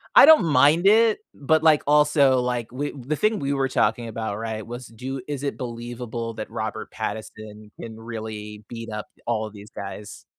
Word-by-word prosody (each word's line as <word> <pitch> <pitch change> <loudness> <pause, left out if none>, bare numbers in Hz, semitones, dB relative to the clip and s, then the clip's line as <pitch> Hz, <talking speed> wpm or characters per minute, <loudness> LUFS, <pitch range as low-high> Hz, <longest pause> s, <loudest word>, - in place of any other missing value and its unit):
I - - +11
don't 310 - +7
mind 155 +5 +4
it, 220 +1 +5 0.2
but, 155 +2 +2
like, 155 -2 +5
also, 145 -3 +4
like, 125 -2 -2
we 145 +4 -3
the 140 +2 -4
thing 215 +7 +1
we 140 -1 -1
were 135 -1 +1
talking 115 -1 +1
about, 110 -2 -4
right, 110 -1 -4
was 120 0 -8
do 130 +4 -6
is 145 -2 -4
it 140 - -2
believable 120 -1 -5
that 110 - -6
Robert 110 0 -5
Pattinson 110 0 -7
can 110 -1 -8
really 110 -2 -7
beat 115 -1 -7
up 105 0 -5 0.2
all 110 -2 -1
these 105 0 -12
guys? 100 -1 -8
120 Hz, 180 wpm, -24 LUFS, 110-140 Hz, 0.2 s, I